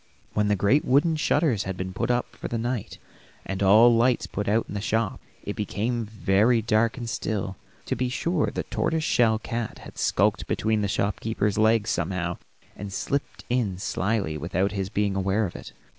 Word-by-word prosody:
When 105 -1 +1
the 105 - +3
great 105 +10 +3
wooden 145 +5 +3
shutters 145 - +1
had 95 -1 -4
been 95 0 -4
put - - -2
up 120 0 0
for - - -6
the 115 - -2
night, 120 -1 -3 0.5
and 95 0 -4
all 110 +5 +7
lights 120 +2 +3
put 105 - -4
out 110 +2 +2
in - - -8
the 100 - -3
shop, 110 -1 -1 0.2
it 105 - -4
became 110 +3 -2
very 110 +2 +2
dark 110 +1 +1
and 120 -2 -5
still; 105 -3 -2 0.3
to - - -1
be 125 -1 -1
sure 165 +5 0
the - - -3
tortoise 160 -1 -1
shell 115 -7 +3
cat 115 +1 -4
had - - -11
skulked 100 0 +1
between 110 0 0
the 100 - 0
shopkeeper's 105 +1 -1
legs 110 0 +3
somehow, 85 0 -2 0.4
and 100 0 -7
slipped 140 +8 -3
in 115 -7 0
slyly 95 -4 -1
without 90 +5 0
his 100 -2 -3
being 105 -2 0
aware 95 +3 +1
of 90 - -6
it. - - -9
105 Hz, 190 wpm, -25 LUFS, 100-115 Hz, 0.5 s, all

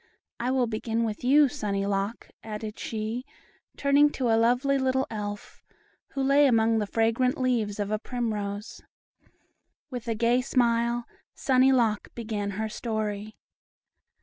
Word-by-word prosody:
I 240 +2 -1
will 260 -1 +2
begin 225 0 -2
with 220 -1 -3
you, 285 +3 +6
Sunny 205 -8 -2
Lock," 200 +3 -2
added 215 0 -6
she, 220 +2 -3 0.5
turning 285 +1 +4
to 250 -3 -1
a 225 - +4
lovely 250 +5 +2
little 265 0 +1
Elf, 205 -1 -6 0.5
who 275 - -1
lay 280 +1 +5
among 225 -2 +3
the 210 - -2
fragrant 230 +4 +1
leaves 230 -6 0
of 205 0 -2
a 215 - 0
primrose. 210 -4 -4 1.1
With 245 -2 -6
a 230 - 0
gay 235 +3 +2
smile, 235 -2 +1 0.3
"Sunny 260 0 +4
Lock" 230 -5 +2
began 215 -3 -3
her 220 0 -1
story. 215 -2 -4
230 Hz, 140 wpm, -27 LUFS, 215-255 Hz, 1.1 s, you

